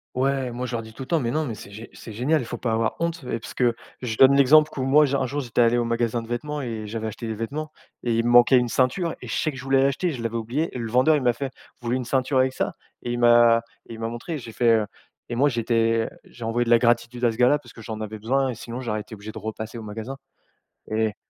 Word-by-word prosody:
ouais, 135 0 0
moi, 125 +1 -3
je 125 - -5
leur 115 - -2
dis 110 0 -12
tout 135 - -7
le - - -11
temps: 165 +3 +2
«Mais 120 -5 -1
non, 155 +5 0
mais 115 -5 -4
c'est 100 -1 -11
gé 110 +3 -9
c'est 110 - -10
génial, 135 +9 +1
il - - -5
faut - - -5
pas 120 - -2
avoir 110 0 0
honte» 170 -1 -2
et - - -1
parce 115 - -9
que 120 -2 +2 0.3
je 120 -3 -3
donne 135 +4 +7
l'exemple 150 +3 +6
q - - -7
où 130 - 0
moi 150 +3 +5
j'ai 140 0 -1
un 130 - 0
jour 145 +3 -2
j'étais 120 -4 -3
allé 120 0 +5
au 120 - +2
magasin 115 0 0
de 115 - -11
vêtements 150 +5 -3
et 115 -4 -5
j'avais 110 +1 -4
acheté 110 +2 -6
des 110 - -2
vêtements, 145 +8 -5 0.3
et 120 -2 +1
il 115 - +2
me 120 - +1
manquait 120 +2 +7
une 125 -1 +1
ceinture, 135 - +1
et - - -8
je - - -3
sais 155 - 0
que 135 - -10
je 125 - -8
voulais 135 0 +3
l'acheter, 140 +6 +1
je 125 -6 -6
l'avais 115 0 -2
oublié, 125 +9 -2
et 125 - -5
le 115 -1 -4
vendeur, 130 +7 +4
il - - -2
m'a 120 -1 +3
fait: 135 +2 -4 0.3
«Vous 120 - -7
voulez 120 +2 +1
une 130 - -4
ceinture 130 +2 0
avec 130 0 +3
ça?». - - -2 0.3
Et 120 - -3
il 120 - -2
m'a 120 -1 +6 0.3
et - - -7
il - - -11
m'a 115 - -2
montré, 120 +8 -5
j'ai 115 -5 -9
fait, 120 +1 +2
heu, 110 -1 +1 0.4
et 120 - -4
moi 140 +4 +3
j'étais 115 -2 +1 0.2
j'ai 120 - -10
envoyé 115 +2 +1
de 120 - -4
la 120 -1 +6
gratitude 120 +1 +1
à 120 - +4
ce - - -9
gars-là, 125 +5 +4
parce 120 -5 -16
que - - -12
j'en 110 -1 -6
avais 110 0 -5
besoin, 130 +6 +1
et 125 - -4
sinon 120 +2 -7
j'aurais 110 -4 -2
été 110 - -10
obligé 105 +1 -9
de - - -9
repasser 110 +2 -6
au 115 - -7
magasin, 110 +5 -6 0.7
et 110 -1 0
120 Hz, 300 wpm, -24 LUFS, 115-135 Hz, 0.7 s, donne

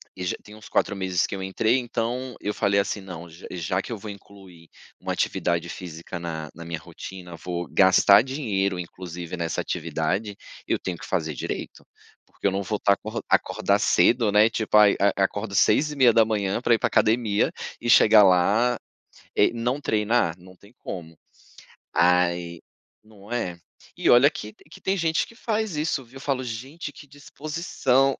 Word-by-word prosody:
E 90 - -5
já - - -1
tem 105 +1 -13
uns 110 - -13
4 100 - 0
meses 95 -2 0
que - - -6
eu 95 - -6
entrei, 110 +6 +1
então 120 +1 -3
eu 105 - -2
falei 100 0 +2
assim: 100 +1 -1
"Não, 85 -3 -9
j 85 +4 -12
já 90 +2 -2
que - - -9
eu - - -5
vou 105 +1 -7
incluir 95 -4 -15 0.3
uma - - -3
atividade 85 0 -1
física 85 0 -7
na 80 -3 -5
na 85 +1 -10
minha 85 -2 -4
rotina, 90 +1 -10
vou 85 -1 -4
gastar 100 +1 +6
dinheiro, 105 -9 -1
inclusive, 90 0 -7
nessa 85 -2 -2
atividade, 90 +6 -2 0.3
eu - - +1
tenho 90 -2 -5
que - - -10
fazer 80 -5 -1
direito, - - -6 0.4
porque - - -13
eu 100 - +4
não 100 +1 -1
vou 105 +2 -2
estar 100 - +3
acor 110 +3 -5
acordar - - +2
cedo, 110 -3 +3
né 105 +2 +6
tipo 110 -1 -2
aí 105 -1 +6
a 100 -1 +2
acordo 100 +1 -2
6h30 115 -4 +3
pra 120 - +3
ir 115 - +3
pra - - +1
academia 110 -2 +2 0.3
e 120 - -3
chegar 110 -2 +7
lá, 105 +6 +3 0.6
eh, - - +4
não 120 +5 -2
treinar, 105 -7 +1
não 90 +1 -16
tem 100 +5 -20
como. 80 -3 -8 0.8
Ai 85 0 +2 0.4
não 105 0 -16
é? 90 -8 -2 0.4
E - - +1
olha 125 +4 +7
que 110 -7 -8 0.2
que - - -14
tem 190 +1 0
gente 160 -2 +1
que 230 - -17
faz 220 -6 -2
isso, 150 -3 -1
viu. 130 +2 -14
Eu - - -10
falo 135 -2 -1
gente 130 +7 -6
que 145 - -14
disposição, 145 -2 0
100 Hz, 175 wpm, -25 LUFS, 90-120 Hz, 0.8 s, chegar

